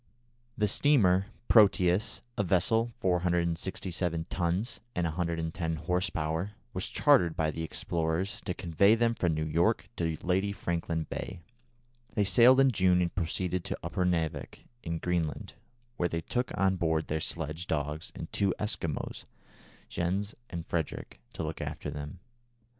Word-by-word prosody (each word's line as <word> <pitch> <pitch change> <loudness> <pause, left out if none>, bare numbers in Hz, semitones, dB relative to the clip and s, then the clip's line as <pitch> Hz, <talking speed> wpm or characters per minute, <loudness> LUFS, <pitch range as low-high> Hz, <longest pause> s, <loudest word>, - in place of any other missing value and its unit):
The 105 - +2
steamer 100 -6 +4 0.2
Proteus, 100 -1 +4
a - - +1
vessel 105 +6 +2
467 85 -1 0
tons 95 +7 -1 0.2
and 90 - +1
110 80 0 -2
horse 90 +5 0
power, 80 +6 -2 0.2
was 90 +1 -1
chartered 125 - +4
by 80 -1 +1
the 80 - -5
explorers 80 +3 -2
to 90 - -2
convey 100 +5 +4
them 115 0 +2
from 85 -7 0
New 80 0 -1
York 85 +3 +1
to 80 -2 -1
Lady 95 +3 +1
Franklin 85 -3 -2
Bay. 95 -2 -5 0.7
They 105 - +3
sailed 120 +7 +6
in 135 -1 +6
June 95 -4 +3
and 85 -1 0
proceeded 90 0 -1
to - - -2
Upernavik, 85 -4 -1 0.2
in 85 0 -3
Greenland, 85 -3 -2 0.4
where 85 - +1
they 85 0 -2
took 125 +8 -2
on 95 -1 +2
board 80 -2 +1
their 80 - -1
sledge 80 +1 -4
dogs 75 0 -2
and - - -7
two 100 -2 +1
Eskimo, 85 -8 -3 0.6
Jens 95 +4 -1 0.2
and 85 -1 -5
Frederick, 80 -4 -3
to - - -4
look - - -4
after - - -4
them. 75 +4 -7
90 Hz, 140 wpm, -30 LUFS, 80-95 Hz, 0.7 s, sailed